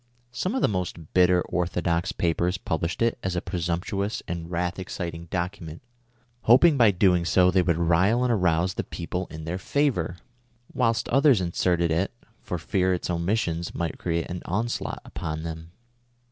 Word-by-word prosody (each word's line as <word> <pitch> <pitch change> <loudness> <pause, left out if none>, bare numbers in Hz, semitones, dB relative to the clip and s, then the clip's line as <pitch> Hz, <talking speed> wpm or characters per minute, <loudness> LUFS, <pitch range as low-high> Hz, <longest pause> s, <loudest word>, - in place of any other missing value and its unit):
Some 185 - -2
of 265 - 0
the - - +5
most 90 -5 -4
bitter 90 -1 +4
orthodox 90 0 -1
papers 85 +2 0
published 85 +3 -2
it 115 0 +1
as 95 -1 -2
a - - +1
presumptuous 90 +4 -2
and 85 -1 -5
wrath 90 +1 -2
exciting 85 -2 -5
document, 85 -1 -4 0.6
lioping 145 +8 +7
by 120 -5 +6
so 95 - -2
doing 90 -1 +4
they 95 - +4
would 85 -2 +1
rile 90 +8 +3
and 125 -1 +2
arouse 90 -2 +2
the - - -3
people 90 +2 -4
in 80 0 -8
tlieir 90 +3 -3
favor; 100 - 0 0.6
M'hilst 115 -3 +1
others 135 -3 +5
inserted 85 -1 +1
it, 85 +4 +1 0.3
for 90 - -4
fear 95 +2 +1
its 90 - -3
omission 85 -1 0
might 85 -1 -3
create 85 -1 -1
an 90 0 -5
onslaught 115 +6 -2
upon 80 -1 -5
them. 80 0 -6
90 Hz, 160 wpm, -26 LUFS, 85-100 Hz, 0.6 s, lioping